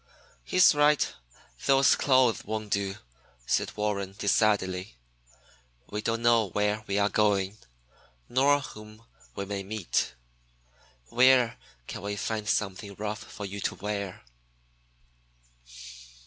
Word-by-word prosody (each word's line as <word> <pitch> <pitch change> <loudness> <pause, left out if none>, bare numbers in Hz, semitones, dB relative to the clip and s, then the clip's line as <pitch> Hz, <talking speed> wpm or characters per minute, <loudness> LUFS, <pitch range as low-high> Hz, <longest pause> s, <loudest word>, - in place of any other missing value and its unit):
"He's 185 - +5
right. 150 0 +3 0.5
Those 135 -1 +5
clothes 130 -4 +3
won't 110 -1 -5
do," 100 -1 0 0.5
said - - -1
Warren 100 -2 -2
decidedly. 100 - +1 1.0
"We 105 - -3
don't 115 +1 -2
know 115 -3 +4
where 105 +3 0
we 100 - -1
are 100 0 +3
going, 105 -1 +1 0.7
nor 140 +3 +3
whom 110 -2 -11 0.3
we 100 - -4
may 100 0 -4
meet. 100 - -2 0.9
Where 125 -1 +4 0.3
can - - -7
we 100 0 -3
find 105 +1 -3
something 100 -1 -2
rough 105 +1 -4
for 105 - -8
you 100 +1 -6
to - - -2
wear?" 100 -2 -5
105 Hz, 115 wpm, -28 LUFS, 100-115 Hz, 1.0 s, He's